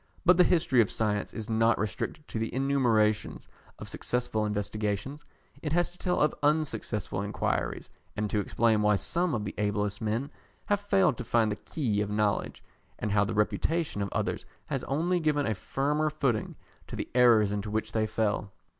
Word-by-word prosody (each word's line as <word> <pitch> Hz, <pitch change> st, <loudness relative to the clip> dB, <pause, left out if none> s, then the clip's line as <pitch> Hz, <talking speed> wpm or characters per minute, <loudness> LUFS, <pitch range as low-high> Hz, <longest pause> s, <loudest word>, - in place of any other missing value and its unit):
But 180 Hz, 0 st, +6 dB
the 180 Hz, -, +7 dB
history 165 Hz, -9 st, +3 dB
of 105 Hz, -, +1 dB
science 105 Hz, -2 st, -1 dB
is 110 Hz, -2 st, -6 dB
not 115 Hz, +1 st, +3 dB
restricted 110 Hz, +8 st, -4 dB
to 110 Hz, -, -3 dB
the 115 Hz, -, -2 dB
enumeration 120 Hz, -6 st, +2 dB, 0.4 s
of -, -, -8 dB
successful 120 Hz, -3 st, -1 dB
investigations. 105 Hz, +6 st, -3 dB, 0.4 s
It 150 Hz, -1 st, -2 dB
has 175 Hz, +1 st, +2 dB
to 180 Hz, -, -19 dB
tell 180 Hz, -1 st, 0 dB
of 150 Hz, 0 st, +3 dB
unsuccessful 145 Hz, -, 0 dB
inquiries, 105 Hz, +1 st, -2 dB, 0.3 s
and 105 Hz, 0 st, 0 dB
to 105 Hz, -, +1 dB
explain 110 Hz, +1 st, +2 dB
why 105 Hz, 0 st, +4 dB
some 170 Hz, -, 0 dB
of 105 Hz, -2 st, -3 dB
the 100 Hz, -, -4 dB
ablest 105 Hz, 0 st, -1 dB
men 115 Hz, +6 st, -1 dB, 0.3 s
have 205 Hz, -1 st, +1 dB
failed 195 Hz, -, +2 dB
to -, -, -4 dB
find 115 Hz, -2 st, +2 dB
the -, -, -1 dB
key 110 Hz, -5 st, -2 dB
of 105 Hz, -, -2 dB
knowledge, 105 Hz, 0 st, -1 dB, 0.3 s
and 105 Hz, -, -3 dB
how 100 Hz, 0 st, +4 dB
the 100 Hz, -, -3 dB
reputation 145 Hz, +4 st, 0 dB
of 100 Hz, -, -1 dB
others -, -, -2 dB, 0.2 s
has -, -, -3 dB
only 170 Hz, +6 st, +1 dB
given 150 Hz, -3 st, +1 dB
a 110 Hz, -, +1 dB
firmer 145 Hz, +8 st, 0 dB
footing 135 Hz, -8 st, -1 dB, 0.3 s
to -, -, -7 dB
the -, -, -4 dB
errors 115 Hz, -5 st, +5 dB
into 105 Hz, 0 st, -3 dB
which 110 Hz, +1 st, -2 dB
they 110 Hz, -1 st, 0 dB
fell. 105 Hz, -2 st, -1 dB
110 Hz, 180 wpm, -29 LUFS, 105-145 Hz, 0.4 s, the